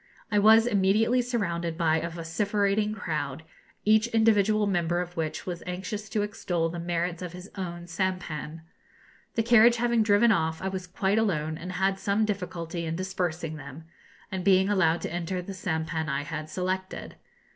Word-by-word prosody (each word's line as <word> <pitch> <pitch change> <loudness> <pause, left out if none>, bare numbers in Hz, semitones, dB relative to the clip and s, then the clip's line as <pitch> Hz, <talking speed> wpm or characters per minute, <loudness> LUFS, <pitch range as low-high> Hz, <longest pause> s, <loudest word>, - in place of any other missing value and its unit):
I 210 - +4
was 220 +2 +7
immediately 220 +3 +3
surrounded 170 -9 -2
by 160 -2 +3
a 170 +1 -2
vociferating 200 +5 0
crowd, 155 -7 -3 0.4
each 215 +1 +4
individual 215 -2 +3
member 175 -3 +1
of 175 0 -5
which 160 -2 -3
was 175 -2 -4
anxious 190 +4 -5
to 210 0 0
extol 175 -5 -1
the 170 +1 -5
merits 175 0 -2
of 180 -1 -6
his 180 +2 -10
own 175 -3 -5
sampan. 170 -3 -3 0.7
The 225 - +2
carriage 235 0 +6
having 235 -1 +2
driven 215 +2 +4
off, 160 -5 +1
I 190 - -2
was 190 -1 -5
quite 190 +3 +1
alone, 160 -8 0
and 180 +3 -6
had 190 +1 +1
some 205 +2 +1
difficulty 175 -4 -4
in 160 0 -2
dispersing 175 -3 -3
them, 140 +2 -9 0.5
and 190 -1 -3
being 190 0 +4
allowed 175 -5 +2
to - - -4
enter 175 +1 -2
the 180 +2 -6
sampan 160 -4 -2
I 140 +1 -1
had 155 0 -5
selected. 185 +1 -4
185 Hz, 170 wpm, -27 LUFS, 165-205 Hz, 0.7 s, was